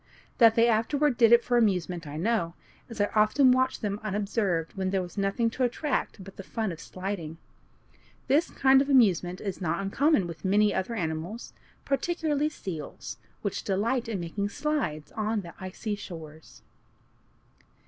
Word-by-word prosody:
That 225 Hz, -2 st, +7 dB
they 230 Hz, 0 st, +5 dB
afterward 255 Hz, +5 st, +2 dB
did 230 Hz, -1 st, +5 dB
it 235 Hz, 0 st, +7 dB
for 245 Hz, -, +1 dB
amusement 180 Hz, -6 st, 0 dB
I 145 Hz, +1 st, -6 dB
know, 175 Hz, -2 st, 0 dB, 0.3 s
as 230 Hz, -2 st, -9 dB
I 205 Hz, -, +1 dB
often 220 Hz, +5 st, +5 dB
watched 260 Hz, -1 st, +1 dB
them 205 Hz, -1 st, -2 dB
unobserved 200 Hz, -5 st, -1 dB
when 190 Hz, -1 st, -2 dB
there 190 Hz, -1 st, 0 dB
was 175 Hz, -, -10 dB
nothing 200 Hz, +3 st, 0 dB
to 255 Hz, -, -2 dB
attract 250 Hz, -4 st, -1 dB
but 195 Hz, 0 st, -13 dB
the 195 Hz, -, -7 dB
fun 220 Hz, 0 st, -3 dB
of 165 Hz, -, -8 dB
sliding. 185 Hz, -4 st, -5 dB, 0.9 s
This 285 Hz, +5 st, +2 dB
kind 265 Hz, 0 st, +4 dB
of 280 Hz, -, -2 dB
amusement 185 Hz, -, +3 dB
is 195 Hz, -2 st, -5 dB
not 170 Hz, +1 st, -1 dB
uncommon 205 Hz, -, +2 dB
with 165 Hz, -2 st, -8 dB
many 205 Hz, +2 st, +3 dB
other 210 Hz, +5 st, -2 dB
animals, 170 Hz, +4 st, -4 dB, 0.3 s
particularly 300 Hz, 0 st, 0 dB
seals, 175 Hz, -, -7 dB, 0.3 s
which -, -, -2 dB
delight 230 Hz, +5 st, 0 dB
in 210 Hz, -4 st, -2 dB
making 200 Hz, +4 st, -3 dB
"slides" 205 Hz, -, -2 dB
on 215 Hz, 0 st, -1 dB
the 170 Hz, -2 st, -10 dB
icy 190 Hz, +3 st, -5 dB
shores. 160 Hz, -6 st, -10 dB
205 Hz, 160 wpm, -28 LUFS, 180-240 Hz, 0.9 s, That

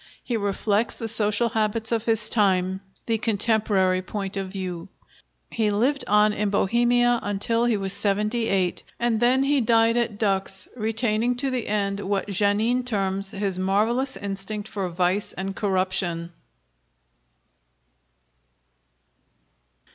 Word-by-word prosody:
He 245 Hz, -, -2 dB
reflects 205 Hz, +1 st, 0 dB
the 225 Hz, -, -5 dB
social 220 Hz, +1 st, +1 dB
habits 220 Hz, 0 st, -1 dB
of 230 Hz, -1 st, 0 dB
his 225 Hz, -2 st, +2 dB
time, 190 Hz, -3 st, +2 dB, 0.2 s
the 225 Hz, -1 st, 0 dB
contemporary 210 Hz, -4 st, +2 dB
point 195 Hz, +1 st, -5 dB
of 195 Hz, -1 st, -3 dB
view. 185 Hz, -2 st, -5 dB, 0.6 s
He 220 Hz, -2 st, 0 dB
lived 250 Hz, +7 st, +1 dB
on 210 Hz, +1 st, +4 dB
in 210 Hz, 0 st, -1 dB
Bohemia 240 Hz, +4 st, +2 dB
until 230 Hz, +4 st, 0 dB
he 235 Hz, -3 st, +2 dB
was 195 Hz, -1 st, -3 dB
seventy 210 Hz, +3 st, 0 dB
eight, 185 Hz, -2 st, 0 dB, 0.2 s
and 235 Hz, -2 st, +1 dB
then 250 Hz, +3 st, +3 dB
he 280 Hz, 0 st, +2 dB
died 230 Hz, 0 st, +3 dB
at 230 Hz, -3 st, -1 dB
Dux, 195 Hz, -2 st, -1 dB
retaining 225 Hz, +1 st, 0 dB
to 270 Hz, +2 st, -1 dB
the 250 Hz, -3 st, -2 dB
end 200 Hz, -1 st, -1 dB
what 200 Hz, 0 st, -2 dB
Janin 210 Hz, +5 st, +1 dB
terms 195 Hz, -4 st, -1 dB
"his 195 Hz, -2 st, -2 dB
marvelous 220 Hz, +8 st, 0 dB
instinct 200 Hz, +1 st, -4 dB
for 195 Hz, -4 st, -3 dB
vice 180 Hz, +3 st, -1 dB
and 195 Hz, 0 st, -5 dB
corruption." 185 Hz, -4 st, -1 dB
210 Hz, 130 wpm, -24 LUFS, 195-230 Hz, 0.6 s, on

